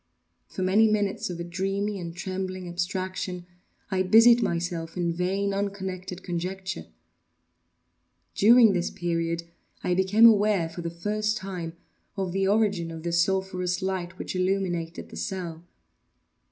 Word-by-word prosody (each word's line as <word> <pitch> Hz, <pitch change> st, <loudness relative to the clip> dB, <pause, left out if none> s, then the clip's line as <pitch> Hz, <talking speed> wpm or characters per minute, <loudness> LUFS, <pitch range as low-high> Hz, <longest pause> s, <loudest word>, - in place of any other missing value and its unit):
For 185 Hz, -, -4 dB
many 205 Hz, +4 st, +5 dB
minutes 205 Hz, -3 st, 0 dB
of 175 Hz, -1 st, -5 dB
a -, -, -3 dB
dreamy 195 Hz, +4 st, -2 dB
and 170 Hz, -1 st, -6 dB
trembling 185 Hz, 0 st, -4 dB
abstraction, 180 Hz, 0 st, -3 dB, 0.5 s
I 190 Hz, -1 st, +1 dB
busied 230 Hz, +5 st, +7 dB
myself 170 Hz, -3 st, -2 dB
in 170 Hz, -1 st, 0 dB
vain, 195 Hz, +3 st, -1 dB
unconnected 190 Hz, -2 st, -4 dB
conjecture. 185 Hz, +2 st, -4 dB, 1.5 s
During 225 Hz, 0 st, +6 dB
this 175 Hz, -1 st, 0 dB
period, 170 Hz, -1 st, -2 dB, 0.4 s
I 180 Hz, -, +1 dB
became 190 Hz, +5 st, +5 dB
aware, 205 Hz, -6 st, +5 dB
for 170 Hz, +2 st, -7 dB
the 170 Hz, -, -3 dB
first 210 Hz, +5 st, -1 dB
time, 180 Hz, -4 st, -5 dB, 0.4 s
of 190 Hz, -2 st, -2 dB
the 195 Hz, +1 st, +1 dB
origin 200 Hz, -5 st, +2 dB
of 165 Hz, -1 st, -8 dB
the 170 Hz, -, -2 dB
sulphurous 180 Hz, +1 st, 0 dB
light 185 Hz, -1 st, -3 dB
which -, -, -5 dB
illumined 185 Hz, -3 st, -1 dB
the -, -, -9 dB
cell. 175 Hz, -4 st, -5 dB
185 Hz, 135 wpm, -26 LUFS, 175-195 Hz, 1.5 s, busied